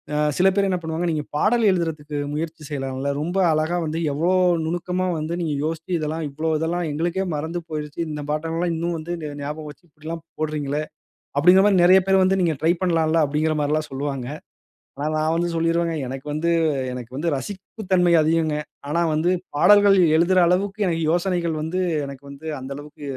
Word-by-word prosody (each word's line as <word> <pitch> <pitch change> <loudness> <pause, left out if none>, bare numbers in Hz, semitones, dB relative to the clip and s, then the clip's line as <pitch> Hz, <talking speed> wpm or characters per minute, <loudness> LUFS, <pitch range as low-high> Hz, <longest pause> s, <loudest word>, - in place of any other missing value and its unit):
ஆ - - +1 0.2
சில 185 - +4
பேரு 200 -1 +2
என்ன 185 - +1
பண்ணுவாங்க, 160 +2 -2
"நீங்க 155 -2 -1
பாடல் 230 +10 +2
எழுதுறதுக்கு 155 -4 -2 0.2
முயற்சி 160 +1 -4
செய்யலாம்ல. 135 -1 -3
ரொம்ப 175 +5 -2
அழகா 155 +3 +1
வந்து 160 +1 -2
எவ்ளோ 165 +6 +1 0.3
நுணுக்கமா 180 +2 -1
வந்து 155 +2 -3
நீங்க 160 -3 -1
யோசிச்சு 165 +2 -4
இதெல்லாம் 155 +1 -3
இவ்ளோ 155 +3 -2
இதெல்லாம் 170 +1 -1
எங்களுக்கே 175 +5 -1
மறந்து 160 +4 -3
போயிருச்சு. 150 -1 -5
இந்த 150 -1 -5
பாட்டு 155 +2 -2
எல்லாம் 170 0 0
இன்னும் 170 +1 -2
வந்து 165 +2 -5
ந 150 -1 -5
ஞாபகம் 150 +1 -5
வச்சிக்கிட்டலெல்லாம் 160 +1 -9 0.2
போடுறீங்களே!" 150 -1 -2 0.6
அப்பிடிங்கிறமாரி 190 +6 +6
நிறைய 185 +2 +7
பேர் 190 0 +4
வந்து 190 +1 +3
நீங்க 170 -2 +2
ட்ரை 160 +2 +3
பண்ணலாம்ல. 165 -2 +2
அப்பிடிங்கிறமாரிலாம் 150 +1 0
சொல்வாங்க. 135 -2 -3 0.7
ஆனா, 145 +2 -2
நான் 155 +1 +1
வந்து 175 +1 0
சொல்லிருவேங்க, 165 0 +1
எனக்கு 135 +2 -7
வந்து 165 +3 0 0.4
எனக்கு 125 -1 -7
வந்து 165 +2 0
ரசிப்பு 190 - -7
தன்மை 175 -2 +4
அதிகங்க. 160 0 +1 0.3
ஆனா 170 +3 +1
வந்து 160 +4 +2 0.3
பாடல்கள் 205 +3 +6 0.2
எழுதுற 180 +3 +4
அளவுக்கு 200 +4 +1
எனக்கு 165 -2 0
யோசனைகள் 175 -2 0
வந்து 165 +4 -2 0.3
எனக்கு 140 0 -10
வந்து 140 +3 -10
அந்த 130 +1 -7
அளவுக்கு 150 0 -11
160 Hz, 170 wpm, -23 LUFS, 150-175 Hz, 0.7 s, நிறைய